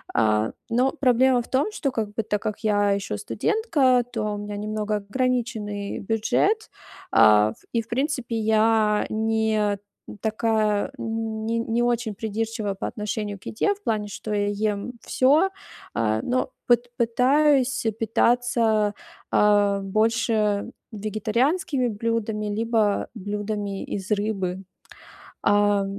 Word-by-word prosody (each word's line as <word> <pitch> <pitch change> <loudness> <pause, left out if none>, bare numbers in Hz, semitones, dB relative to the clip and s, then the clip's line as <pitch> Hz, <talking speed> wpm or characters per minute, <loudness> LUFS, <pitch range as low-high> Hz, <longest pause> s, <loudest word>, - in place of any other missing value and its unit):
А, 110 0 +2 0.2
но 250 +3 +2
проблема 260 -3 +3
в - - -15
том, 280 +11 +1
что, 280 -9 -2
как 220 -4 -3
бы, 225 - -1
так 210 -1 -2
как 210 -1 -3
я 205 -1 +2
ещё 200 -1 -2
студентка, 295 - +1
то 225 -3 -2
у - - -5
меня 205 0 -5
немного 215 0 -2
ограниченный 210 -2 -2
бюджет, 225 - 0 0.4
а, 105 0 +6
в - - -25
и, 230 - +2
в - - -24
принципе, 255 -2 -1
я 220 -1 +3
не 220 -2 0 0.4
такая, 220 0 0
не 225 -1 -2
не 230 +1 0
очень 240 -3 0
придирчивая 220 0 -3
по - - -4
отношению 210 -1 -4
к - - -21
еде. 405 - +1
В 410 - -25
плане, 215 - -1
что 210 +1 -5
я 205 -1 +1
ем 205 +2 -2
всё, 300 +9 +3 0.4
а, 110 -1 0
но 255 +1 -1 0.2
пыт 240 0 +3
пытаюсь 270 +3 +3 0.2
питаться, 225 -2 +2 0.4
а, 205 -1 +4
больше 215 +1 +1 0.2
вегетарианскими 235 - 0
блюдами 220 -1 -2
либо 215 -1 +1
блюдами 205 0 -4
из 195 +1 -5
рыбы. 195 -3 -1 0.8
А. 205 -1 +3
220 Hz, 125 wpm, -24 LUFS, 205-240 Hz, 0.8 s, а